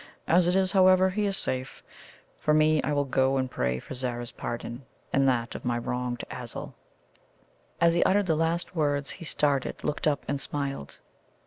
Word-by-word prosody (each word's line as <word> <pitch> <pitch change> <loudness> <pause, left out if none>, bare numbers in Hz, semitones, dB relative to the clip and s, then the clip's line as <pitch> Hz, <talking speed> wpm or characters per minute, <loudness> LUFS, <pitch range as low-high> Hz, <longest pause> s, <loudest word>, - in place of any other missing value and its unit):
As 175 +1 +4
it 180 - +2
is, 190 -1 +2
however, 185 -1 +5
he 205 +2 0
is 195 - -1
safe. 130 +1 -4 0.6
For 150 - +2
me, 155 0 +4
I - - -2
will 145 -1 +1
go 135 0 +2
and 130 -1 -1
pray 65 0 0
for 65 - -8
Zara's 120 -2 -4
pardon, 120 +2 -5 0.3
and 135 0 +4
that 120 -2 +1
of - - -7
my 120 -1 0
wronged 125 0 -3
Azul." - - -7 1.1
As 170 0 +5
he 170 - +2
uttered 205 +1 +3
the 165 -3 +2
last 165 +3 -1
words, 145 -3 0
he 170 - -8
started, 145 -4 0
looked 150 - -1
up, 145 -3 0
and 140 0 -1
smiled. 140 - -4
145 Hz, 185 wpm, -27 LUFS, 130-170 Hz, 1.1 s, however